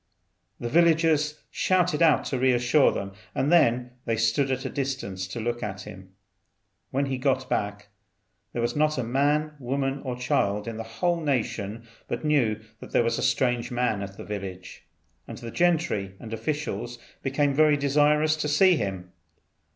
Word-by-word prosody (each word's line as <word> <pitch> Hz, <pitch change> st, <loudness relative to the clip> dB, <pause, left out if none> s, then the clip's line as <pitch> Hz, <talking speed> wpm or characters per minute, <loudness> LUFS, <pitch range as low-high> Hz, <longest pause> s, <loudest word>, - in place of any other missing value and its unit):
The 120 Hz, -, -3 dB
villagers 160 Hz, 0 st, +3 dB
shouted 180 Hz, -4 st, +1 dB
out 155 Hz, -7 st, +4 dB
to 130 Hz, -, -2 dB
re 130 Hz, 0 st, +4 dB
assure 120 Hz, +4 st, +4 dB
them, 100 Hz, 0 st, -4 dB, 0.2 s
and 135 Hz, +4 st, +1 dB
then 125 Hz, -7 st, +3 dB
they 115 Hz, -1 st, 0 dB
stood 115 Hz, +5 st, +2 dB
at 130 Hz, 0 st, -2 dB
a -, -, -1 dB
distance 130 Hz, -9 st, -3 dB
to 95 Hz, +5 st, -6 dB
look 120 Hz, +1 st, -2 dB
at 105 Hz, -3 st, -4 dB
him. 95 Hz, -1 st, -12 dB, 0.7 s
When 140 Hz, +2 st, 0 dB
he 135 Hz, -2 st, -3 dB
got 130 Hz, -1 st, +1 dB
back, 105 Hz, 0 st, -2 dB, 0.6 s
there 120 Hz, -, -2 dB
was 120 Hz, -, -1 dB
not 155 Hz, 0 st, +2 dB
a 130 Hz, -, 0 dB
man, 145 Hz, +5 st, +1 dB
woman, 135 Hz, +1 st, -2 dB
or 130 Hz, -3 st, -3 dB
child 105 Hz, -4 st, 0 dB
in 115 Hz, -1 st, -4 dB
the -, -, -4 dB
whole 165 Hz, +10 st, -1 dB
nation 115 Hz, -6 st, -2 dB, 0.2 s
but -, -, -4 dB
knew 120 Hz, -8 st, +2 dB, 0.2 s
that -, -, -10 dB
there -, -, +4 dB
was 115 Hz, 0 st, 0 dB
a -, -, -2 dB
strange 125 Hz, -2 st, +1 dB
man 120 Hz, -5 st, 0 dB
at 100 Hz, 0 st, -7 dB
the -, -, -8 dB
village; 95 Hz, -3 st, -7 dB, 0.4 s
and -, -, -8 dB
the 115 Hz, -, -7 dB
gentry 155 Hz, -, +1 dB
and 115 Hz, -1 st, -8 dB
officials 120 Hz, 0 st, -3 dB, 0.2 s
became 140 Hz, +1 st, +1 dB
very 150 Hz, +1 st, +4 dB
desirous 150 Hz, +2 st, +3 dB
to 155 Hz, -, -2 dB
see 175 Hz, +4 st, +5 dB
him. 95 Hz, -5 st, -4 dB
130 Hz, 175 wpm, -26 LUFS, 110-150 Hz, 0.7 s, see